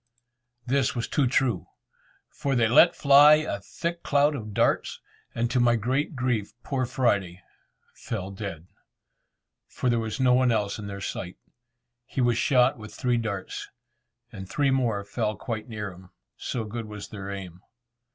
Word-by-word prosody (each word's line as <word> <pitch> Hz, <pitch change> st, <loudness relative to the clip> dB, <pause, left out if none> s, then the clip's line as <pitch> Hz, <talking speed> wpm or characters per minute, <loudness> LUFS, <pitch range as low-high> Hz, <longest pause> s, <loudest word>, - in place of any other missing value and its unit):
This 135 Hz, +1 st, +1 dB
was 120 Hz, -, -2 dB
too 145 Hz, -4 st, +1 dB
true, 120 Hz, -, +1 dB, 0.6 s
for 140 Hz, -3 st, -2 dB
they 115 Hz, -2 st, +3 dB
let 125 Hz, +9 st, +6 dB
fly 145 Hz, +2 st, +7 dB
a 155 Hz, -10 st, -2 dB
thick 170 Hz, -, -5 dB
cloud 145 Hz, +1 st, +3 dB
of 110 Hz, -6 st, -6 dB
darts, -, -, +1 dB, 0.4 s
and 120 Hz, +1 st, 0 dB
to 130 Hz, -, +2 dB
my 120 Hz, -1 st, +4 dB
great 130 Hz, +7 st, -1 dB
grief 125 Hz, -5 st, -1 dB
poor 130 Hz, -3 st, -1 dB
Friday 100 Hz, -9 st, 0 dB, 0.5 s
fell 100 Hz, -4 st, -5 dB
dead, 95 Hz, -5 st, -6 dB, 1.0 s
for 125 Hz, -, -1 dB
there 120 Hz, -, +2 dB
was 110 Hz, +1 st, -4 dB
no 130 Hz, -1 st, +4 dB
one 125 Hz, -1 st, +4 dB
else 105 Hz, -2 st, -1 dB
in 105 Hz, -, -6 dB
their 100 Hz, 0 st, -6 dB
sight. 90 Hz, -1 st, -5 dB, 0.7 s
He -, -, -5 dB
was 120 Hz, -2 st, +3 dB
shot 130 Hz, -2 st, +3 dB
with 110 Hz, 0 st, -10 dB
three 125 Hz, -2 st, +1 dB
darts, 100 Hz, -4 st, -4 dB, 0.6 s
and 95 Hz, -5 st, -9 dB
three 140 Hz, -2 st, +1 dB
more 120 Hz, -6 st, +1 dB
fell 105 Hz, +1 st, -2 dB
quite 110 Hz, +2 st, -5 dB
near 105 Hz, -3 st, -5 dB
him, 90 Hz, +1 st, -15 dB, 0.3 s
so 120 Hz, -, -4 dB
good 110 Hz, +1 st, -5 dB
was 105 Hz, -1 st, -8 dB
their 100 Hz, -2 st, -7 dB
aim. 90 Hz, -3 st, -7 dB
115 Hz, 160 wpm, -26 LUFS, 100-130 Hz, 1.0 s, fly